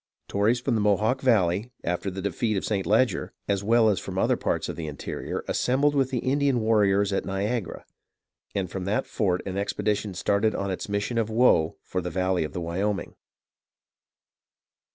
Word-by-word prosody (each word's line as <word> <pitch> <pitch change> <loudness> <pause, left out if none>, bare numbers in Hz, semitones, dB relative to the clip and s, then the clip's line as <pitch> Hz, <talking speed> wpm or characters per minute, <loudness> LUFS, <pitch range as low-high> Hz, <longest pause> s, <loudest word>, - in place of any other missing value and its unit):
Tories 105 +5 +2
from 125 +1 -1
the 110 - +1
Mohawk 105 +5 +2
Val 115 -8 +4
ley, 95 +8 -2
after 90 +3 -1
the 95 0 -6
defeat 100 +2 0
of - - -2
St. 100 -3 -1
Leger, 110 -3 +2
as 100 -1 0
well 115 +1 +4
as 105 -4 +2
from - - -6
other - - +3
parts - - -1
of - - -4
the 80 -2 -5
interior, 70 -2 -5
assembled 140 +4 +2
with 135 -2 +2
the 130 - -2
Indian 140 -1 +2
warriors 100 -3 +3
at - - 0
Niagara; 100 +2 -3 0.7
and 95 -2 0
from 95 -1 -5
that 100 +2 0
fort 90 -5 0
an 95 0 -4
expedition 105 0 -1
started 100 +4 +1
on 100 0 -2
its 95 - -5
mission 105 +4 -1
of 110 -1 0
woe 110 -9 +3
for 90 - -3
the 90 - -4
valley 95 0 0
of 75 - -5
the 90 - -3
Wyoming. 95 +4 -2
100 Hz, 185 wpm, -26 LUFS, 95-115 Hz, 0.7 s, Val